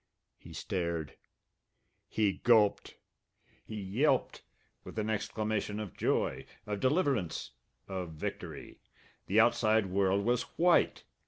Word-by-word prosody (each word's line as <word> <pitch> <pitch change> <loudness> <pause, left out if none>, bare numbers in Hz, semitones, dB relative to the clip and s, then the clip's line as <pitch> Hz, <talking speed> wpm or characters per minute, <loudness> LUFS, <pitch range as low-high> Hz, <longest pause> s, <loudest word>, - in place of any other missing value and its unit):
He - - -13
stared. 85 -5 -3 0.9
He 105 -3 +1
gulped. 110 -4 +3 0.7
He 110 -1 -7
yelped 125 +8 +1 0.4
with - - -10
an 110 0 0
exclamation 105 0 -2
of 105 -5 -6
joy, - - 0 0.2
of 105 -1 -3
deliverance, 130 - 0 0.4
of 90 -4 -5
victory! 75 - -6 0.5
The 105 +4 +3
outside 110 -2 +4
world 95 +1 +1
was 120 0 +2 0.2
white! 175 0 +3
105 Hz, 105 wpm, -31 LUFS, 95-115 Hz, 0.9 s, outside